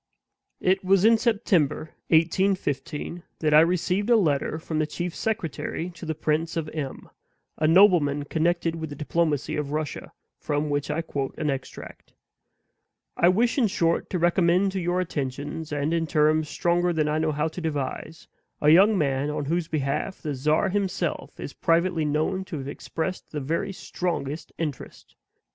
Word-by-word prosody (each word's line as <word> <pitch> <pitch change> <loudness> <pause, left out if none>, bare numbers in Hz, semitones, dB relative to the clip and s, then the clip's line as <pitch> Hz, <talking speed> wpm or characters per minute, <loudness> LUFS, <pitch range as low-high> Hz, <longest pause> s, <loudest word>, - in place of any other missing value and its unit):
It 190 +1 +2
was 195 +1 +4
in 225 0 +6
September, 180 - +1 0.2
1815, 165 -2 0 0.2
that 155 -2 +1
I 150 - +9
received 180 +5 +1
a 240 - +6
letter 155 -7 +1
from 160 0 -3
the 155 - +1
chief 175 +2 -4
secretary 175 - -3
to 170 -1 -10
the 160 - -2
Prince 155 +2 -1
of 160 -2 -2
M, 145 -4 -5 0.5
a 155 - +3
nobleman 165 -5 +5
connected 165 +2 0
with 160 -1 -5
the 145 - -7
diplomacy 150 -1 -1
of 150 -1 -3
Russia, 155 -1 -4 0.3
from 145 0 -1
which 145 0 -1
I 165 +2 -1
quote 135 -4 -4
an 150 - 0
extract: 135 -1 -8 1.0
"I 170 - +4
wish, 230 +8 +2
in 235 - +4
short, 170 -3 0
to 185 - -1
recommend 175 +2 +3
to 190 - -2
your 175 +1 0
attentions, 150 0 -4
and 145 +2 -1
in 165 -1 0
terms 155 0 +2
stronger 175 +1 +1
than 155 -3 +1
I 150 +1 0
know 155 0 +1
how 150 +1 0
to 180 - -7
devise, 155 +1 -4 0.3
a 150 - +3
young 200 +5 +6
man 140 -2 0
on 150 -1 -3
whose 165 +2 -1
behalf 155 +5 -2
the 150 -3 -3
czar 150 +8 +1
himself 190 -4 -2
is - - -6
privately 170 -1 +1
known 155 +6 0
to 175 -4 -6
have 135 -1 -6
expressed 165 +5 -4
the 150 - -4
very 160 +7 -2
strongest 170 -5 -4
interest. 150 -5 -6
160 Hz, 165 wpm, -25 LUFS, 150-180 Hz, 1.0 s, I